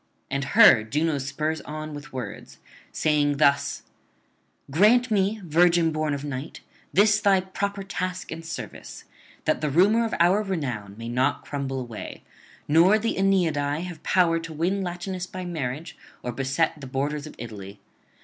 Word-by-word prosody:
And 140 Hz, 0 st, -1 dB
her 215 Hz, -, +8 dB
Juno 150 Hz, +6 st, 0 dB
spurs 155 Hz, +4 st, -2 dB
on 155 Hz, 0 st, -7 dB
with 145 Hz, 0 st, -9 dB
words, 125 Hz, -6 st, -7 dB, 0.3 s
saying 145 Hz, -2 st, +1 dB
thus: 140 Hz, -1 st, +2 dB, 0.9 s
'Grant 225 Hz, -, +4 dB
me, 205 Hz, +1 st, +1 dB
virgin 170 Hz, 0 st, +4 dB
born 155 Hz, -2 st, -1 dB
of 140 Hz, -, -6 dB
Night, 140 Hz, +1 st, -6 dB, 0.3 s
this 210 Hz, +2 st, +4 dB
thy 195 Hz, -2 st, +4 dB
proper 200 Hz, +1 st, -3 dB
task 185 Hz, -1 st, -4 dB
and 165 Hz, +1 st, -6 dB
service, 165 Hz, -, -8 dB, 0.4 s
that -, -, +1 dB
the 150 Hz, -, 0 dB
rumour 200 Hz, +10 st, +4 dB
of 225 Hz, -, -2 dB
our 180 Hz, +5 st, +4 dB
renown 130 Hz, -, -4 dB
may 115 Hz, 0 st, -7 dB
not 130 Hz, +4 st, 0 dB
crumble 135 Hz, -2 st, -3 dB
away, 120 Hz, -4 st, -8 dB, 0.4 s
nor 170 Hz, +8 st, +5 dB
the 225 Hz, +1 st, -1 dB
Aeneadae 165 Hz, -7 st, +1 dB
have 175 Hz, -4 st, -8 dB
power 170 Hz, -3 st, +2 dB
to 165 Hz, 0 st, -8 dB
win 175 Hz, +6 st, -1 dB
Latinus 180 Hz, 0 st, -4 dB
by 185 Hz, -1 st, -7 dB
marriage 155 Hz, -2 st, -4 dB, 0.3 s
or 125 Hz, -, -3 dB
beset 135 Hz, +5 st, -1 dB
the 135 Hz, -, -7 dB
borders 145 Hz, +3 st, -2 dB
of -, -, -11 dB
Italy. 105 Hz, -4 st, -9 dB
160 Hz, 155 wpm, -25 LUFS, 140-185 Hz, 0.9 s, her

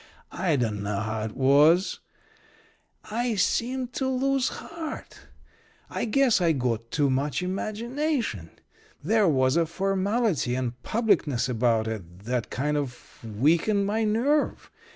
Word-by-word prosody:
I 175 Hz, -5 st, 0 dB
dunno 105 Hz, -5 st, -1 dB
how 110 Hz, 0 st, -3 dB
it 110 Hz, -, -7 dB
was 150 Hz, +7 st, +4 dB, 1.1 s
I 235 Hz, +1 st, 0 dB
seemed 245 Hz, +6 st, 0 dB
to 265 Hz, -, -1 dB
lose 265 Hz, 0 st, +1 dB
heart. 330 Hz, -2 st, -8 dB, 0.6 s
I -, -, -2 dB
guess 245 Hz, -2 st, +3 dB
I 170 Hz, -2 st, +3 dB
got 115 Hz, -4 st, -2 dB
too 145 Hz, 0 st, +1 dB
much 140 Hz, +5 st, -1 dB
imagination. 225 Hz, -, -2 dB, 0.5 s
There 210 Hz, +4 st, +3 dB
was 130 Hz, -3 st, +3 dB
a 165 Hz, -1 st, +2 dB
formality 195 Hz, -, 0 dB
and 125 Hz, -2 st, -2 dB
publicness 195 Hz, -, +1 dB
about 115 Hz, -2 st, +1 dB
it 95 Hz, -5 st, -7 dB
that 120 Hz, -1 st, -2 dB
kind 150 Hz, +3 st, -1 dB
of 135 Hz, -5 st, -6 dB
weakened 160 Hz, -, +2 dB
my 215 Hz, +3 st, 0 dB
nerve. 240 Hz, +8 st, 0 dB
165 Hz, 125 wpm, -26 LUFS, -, 1.1 s, was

